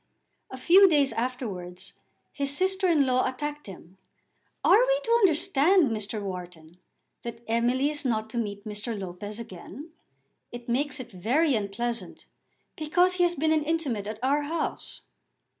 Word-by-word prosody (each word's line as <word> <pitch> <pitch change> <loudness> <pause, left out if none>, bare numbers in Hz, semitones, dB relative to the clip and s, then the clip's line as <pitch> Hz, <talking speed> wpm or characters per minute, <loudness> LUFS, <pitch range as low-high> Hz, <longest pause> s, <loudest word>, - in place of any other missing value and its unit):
A 260 - -8
few 375 +8 +6
days 285 -5 +3
afterwards 200 -6 -5 0.4
his 280 -1 -2
sister 380 +6 +1
in 310 -5 +4
law 255 -1 +2
attacked 295 +2 -5
him. 190 -1 -12 0.6
"Are 420 - +6
we - - +2
to 465 - -2
understand, 360 - +4
Mr. 215 0 -3
Wharton, 175 -3 -8 0.4
that 235 0 -8
Emily 245 +5 +1
is 300 -1 -4
not 220 -4 -1
to 235 - -2
meet 205 -2 -4
Mr. 210 +1 -5
Lopez 195 +3 -7
again? 235 - -10 0.6
It 240 0 -9
makes 280 +4 0
it 240 -2 -8
very 255 - +1
unpleasant, 220 -1 -3 0.5
because 355 +4 +2
he 355 - +3
has 350 0 +2
been 315 +2 +1
intimate 300 -9 0
at 215 0 -5
our 285 +3 +2
house." 310 +2 -4
255 Hz, 145 wpm, -27 LUFS, 210-310 Hz, 0.6 s, few